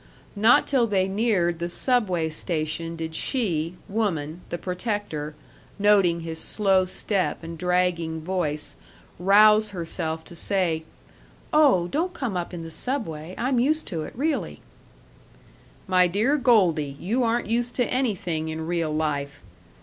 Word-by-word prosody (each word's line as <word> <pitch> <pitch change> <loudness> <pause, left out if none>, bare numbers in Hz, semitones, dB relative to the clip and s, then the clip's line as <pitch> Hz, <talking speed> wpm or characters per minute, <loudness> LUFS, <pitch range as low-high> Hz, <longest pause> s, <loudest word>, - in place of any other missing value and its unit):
Not 220 +4 +5
till 255 -5 +2
they 190 -3 +1
neared 190 -5 +1
the 170 0 -2
Subway 185 -7 +2
station 160 0 -3
did 160 -1 -5
she, 170 - -1
woman, 180 -7 -2
the 175 - -3
protector, 180 -5 -4 0.4
noting 200 -5 +3
his 165 -1 -6
slow 190 0 +2
step 185 0 -1
and 165 0 -6
dragging 180 -2 0
voice, 160 -3 -2 0.4
rouse 210 +3 +6
herself 165 -3 -4
to 170 - -12
say, 170 -3 -1 0.7
"Oh, 275 - +4
don't 335 - -1
come 240 - -3
up 175 -1 -3
in 170 -2 -6
the 165 - -8
Subway; 180 - -4
I'm 255 0 +1
used 310 +6 +2
to 165 -6 -3
it, 155 - -7
really!" 300 +5 -2 1.3
"My 185 -1 +4
dear 215 +11 +1
Goldie, 180 - +2
you 225 +8 -1
aren't 235 0 +1
used 240 +2 -1
to 245 - +2
anything 190 -12 -1
in 160 0 -4
real 165 -2 -1
life. 145 -2 -2
180 Hz, 140 wpm, -25 LUFS, 160-220 Hz, 1.3 s, rouse